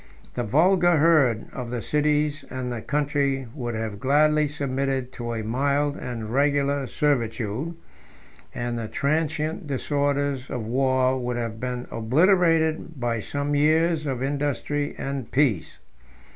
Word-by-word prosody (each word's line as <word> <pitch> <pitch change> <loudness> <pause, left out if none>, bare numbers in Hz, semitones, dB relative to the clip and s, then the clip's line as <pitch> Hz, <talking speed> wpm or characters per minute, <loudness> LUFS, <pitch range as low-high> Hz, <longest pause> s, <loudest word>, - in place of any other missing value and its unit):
The 125 - -2
vulgar 175 - +4
herd 145 -8 +4
of 125 -2 -5
the 120 0 -3
cities 150 0 +1
and 130 -1 -4
the 120 -2 -4
country 140 -1 0
would 120 -5 -4
have 110 -2 -4
gladly 150 +4 +3
submitted 135 -2 -2
to 120 -1 -5
a 110 - -3
mild 140 +5 0
and 115 -5 -5
regular 140 0 +1
servitude; 125 +2 -1 0.8
and 120 0 -3
the 115 - -4
transient 155 - -1
disorders 140 -1 -1
of 120 -3 -4
war 130 +1 +2
would 125 -1 -2
have 115 -2 -4
been 125 0 -3
obliterated 160 - +2
by 120 -2 -1
some 140 +6 -3
years 155 +2 +2
of 130 -2 -2
industry 145 +1 -1
and 135 -3 -4
peace. 130 - +1
140 Hz, 130 wpm, -25 LUFS, 125-150 Hz, 0.8 s, vulgar